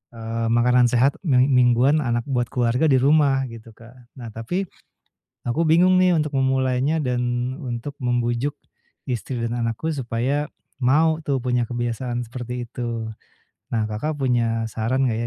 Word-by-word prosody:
eee, 115 0 -3
makanan 125 +1 +4
sehat 125 +4 +2
ming 130 -3 +4
mingguan 125 +3 +4
anak 120 -4 0
buat 125 -2 +1
keluarga 125 +3 +1
di 135 -3 +4
rumah 140 -1 +3
gitu 115 0 -11
Kak, 115 +2 -16 0.2
nah 120 -2 -7
tapi, 115 - -3 0.9
aku 145 +8 +1
bingung 175 +4 +5
nih 185 0 +4
untuk 150 -2 -1
memulainya 130 +3 +1
dan 125 0 -1
untuk 130 -1 -5
membujuk, 120 +2 0 0.6
istri 125 +1 -3
dan 115 +1 -2
anakku 115 +6 -2
supaya, 135 +3 -1 0.3
mau 155 +5 +3
tuh 140 -3 0
punya 125 -1 +1
kebiasaan 120 +1 -3
seperti 125 0 -6
itu, 115 -2 -4 0.7
nah 115 -2 +1
Kakak, 130 +9 -2
punya 120 -3 +1
saran 130 +5 0
enggak 110 - -2
125 Hz, 145 wpm, -22 LUFS, 120-135 Hz, 0.9 s, bingung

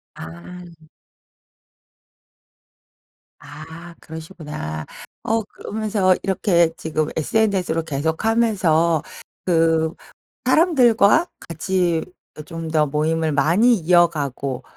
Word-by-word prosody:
아. 165 - -11 2.6
아 160 +3 -11
그러시구나. 155 - -7 0.4
어 225 0 0
그러면서 205 -2 -1
이렇게 175 -4 +2
지금 155 -1 -2
SNS로 180 -2 0
계속 160 +4 -2
하면서 185 -9 +2 0.4
그 165 -2 +2 0.5
사람들과 275 - +4 0.2
같이 170 0 0 0.4
어 - - -6
좀 165 +1 -6
더 155 -1 +3
모임을 155 +2 0
많이 175 - +4
이어가고 155 - +1
165 Hz, 185 characters per minute, -21 LUFS, 155-190 Hz, 2.6 s, 사람들과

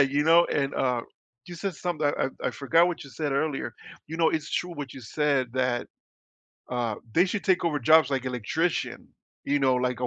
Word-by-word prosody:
you 140 +1 +3
know, 170 +2 +6
and, 140 -1 -1
uh, 125 -2 +1 0.5
you 175 - -8
said 185 +2 -3
something, 155 -3 -2
I 145 - 0
I - - 0
forgot 155 +5 +3
what 175 -3 -5
you 140 - -12
said 145 0 -3
earlier, 140 +1 -1 0.3
you 160 - -6
know, 165 -1 +3
it's 155 -1 -2
true 180 -1 -2
what 145 -5 -6
you 130 - -9
said 135 +1 0
that, 125 -1 0 0.8
uh, 120 -3 -1 0.2
they 175 - +6
should 195 +1 -3
take 185 -2 +2
over 155 -3 +1
jobs 155 +4 +5
like 135 -2 -1
electrician, 130 +8 -2 0.4
you 145 +1 +1
know, 135 -2 +3
like 125 0 -1
a 125 - 0
145 Hz, 205 wpm, -27 LUFS, 130-165 Hz, 0.8 s, know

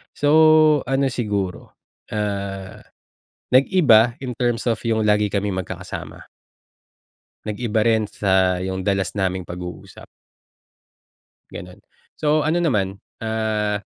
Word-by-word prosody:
So, 155 0 +5
ano 135 0 +1
siguro, 100 -6 -3 0.4
ah, 100 -2 -4 0.7
nag-iba 125 - +5
in 125 -3 -5
terms 120 -2 -1
of 115 - +1
yung 110 -1 +1
lagi 105 -1 +2
kaming 100 -2 -1
magkakasama. - - -8 1.2
Nag-iba 110 0 -1
rin 110 -2 +2
sa 95 -3 +1
yung 95 0 -4
dalas 95 -4 0
naming 95 -1 -1
pag-uusap. 90 0 -9 1.4
Gano'n. 90 +3 -10 0.3
So, 150 0 +1
ano 165 +3 +1
naman, 100 - 0 0.2
ah, 110 -2 -1
105 Hz, 105 wpm, -21 LUFS, 95-125 Hz, 1.4 s, So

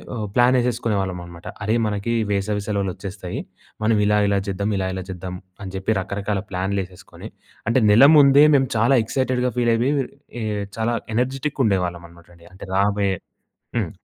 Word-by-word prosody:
ఆహ్, 110 - -3
ప్లాన్ 125 +1 +4
వేసేసుకునే 120 -3 0
వాళ్ళం 95 -2 -3
అనమాట. 85 0 -12 0.2
"అరే! 110 +2 +1
మనకి 105 +2 -2 0.2
వేసవి 100 +1 -1
సెలవులు 100 -3 -1
వచ్చేస్తాయి. 95 -2 -6 0.4
మనం 110 +1 +3
ఇలా, 105 0 +3
ఇలా 100 0 +2
జేద్దం 100 +1 -2
ఇలా, 95 -1 -1
ఇలా 95 -1 -4
జేద్దం" 90 0 -6 0.3
అని 95 -1 -7
చెప్పి, 95 +3 -1
రకరకాల 100 +1 -3
ప్లాన్లు 95 +2 -1
వేసేసుకొని 90 0 -12 0.4
అంటే, 120 +1 +3
నెల 115 +7 +8
ముందే 140 0 +7
మేము 135 -1 +3
చాలా 120 +5 +4
ఎక్సైటెడ్‌గా 125 +1 0
ఫీల్ 120 -1 +2
అయిపోయి 125 +5 +1 0.5
ఆహ్, 105 -2 -2
చాలా 115 +1 0 0.2
ఎనర్జిటిక్‌గా 135 +3 -1
ఉండేవాళ్ళం 90 -4 0
అనమాట 85 0 -19
అండి. 85 +2 -18
అంటే 95 - -10
రాబోయే 100 -1 +1 0.6
హ్మ్. - - -2
105 Hz, 165 wpm, -22 LUFS, 95-120 Hz, 0.6 s, నెల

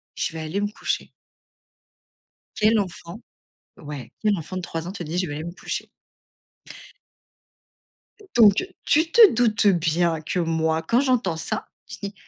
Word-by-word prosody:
«Je - - -2
vais 160 - -5
aller 160 +6 -3
me 205 - +1
coucher.» - - -3 1.5
Quel 215 +1 +3
enfant 180 +1 -7 0.6
ouais. 145 -3 -8
Quel 210 -2 +2
enfant 175 +2 -7
de - - -2
3 165 -1 -5
ans 180 - -5
te 200 - -6
dit: 165 +1 -5
«Je 185 - 0
vais 145 - -5
aller 155 - -5
me 170 - -6
coucher»? - - -5 2.5
Donc, 215 - +6 0.2
tu 320 +2 +3
te 440 +1 +8
doutes 220 -3 +2
bien 170 -3 +2
que 160 - -3
moi, 160 -1 0
quand 230 +9 +2
j'entends 250 -11 +1
ça, 160 - -4 0.2
je - - -8
dis: 200 0 -5
180 Hz, 155 wpm, -23 LUFS, 160-215 Hz, 2.5 s, te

